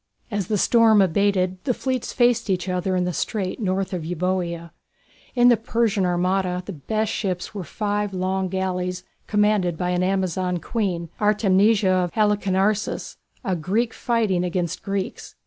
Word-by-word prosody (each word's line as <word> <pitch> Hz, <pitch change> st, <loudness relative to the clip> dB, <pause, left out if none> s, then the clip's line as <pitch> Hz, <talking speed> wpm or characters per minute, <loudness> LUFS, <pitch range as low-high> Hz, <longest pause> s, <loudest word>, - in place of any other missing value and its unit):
As 205 Hz, -4 st, -2 dB
the 210 Hz, -, 0 dB
storm 225 Hz, 0 st, +5 dB
abated 185 Hz, 0 st, +1 dB
the 250 Hz, -, 0 dB
fleets 260 Hz, -2 st, -2 dB
faced 240 Hz, -3 st, +2 dB
each 185 Hz, -1 st, 0 dB
other 185 Hz, +1 st, -1 dB
in 180 Hz, -, +1 dB
the 180 Hz, -, -2 dB
strait 190 Hz, -, -2 dB
north 190 Hz, -2 st, -1 dB
of 175 Hz, -3 st, -3 dB
Euboea. 170 Hz, 0 st, -2 dB, 0.6 s
In 245 Hz, 0 st, +6 dB
the 240 Hz, -, +5 dB
Persian 225 Hz, -4 st, 0 dB
armada 180 Hz, +1 st, 0 dB
the 200 Hz, -, -6 dB
best 215 Hz, +8 st, -2 dB
ships 185 Hz, -2 st, -3 dB
were 200 Hz, -3 st, -5 dB
five 205 Hz, +2 st, -2 dB
long 190 Hz, 0 st, -1 dB
galleys 180 Hz, -1 st, -2 dB, 0.2 s
commanded 210 Hz, -5 st, +2 dB
by 180 Hz, +1 st, -1 dB
an 180 Hz, 0 st, 0 dB
Amazon 185 Hz, -1 st, 0 dB
queen, 175 Hz, -4 st, -2 dB
Artemisia 205 Hz, -1 st, +3 dB
of 180 Hz, -2 st, 0 dB
Halicarnassus, 210 Hz, -1 st, 0 dB, 0.3 s
a 190 Hz, -, 0 dB
Greek 205 Hz, +8 st, -1 dB
fighting 220 Hz, -7 st, 0 dB
against 175 Hz, -1 st, -2 dB
Greeks. 195 Hz, -1 st, -4 dB
190 Hz, 150 wpm, -23 LUFS, 180-210 Hz, 0.6 s, In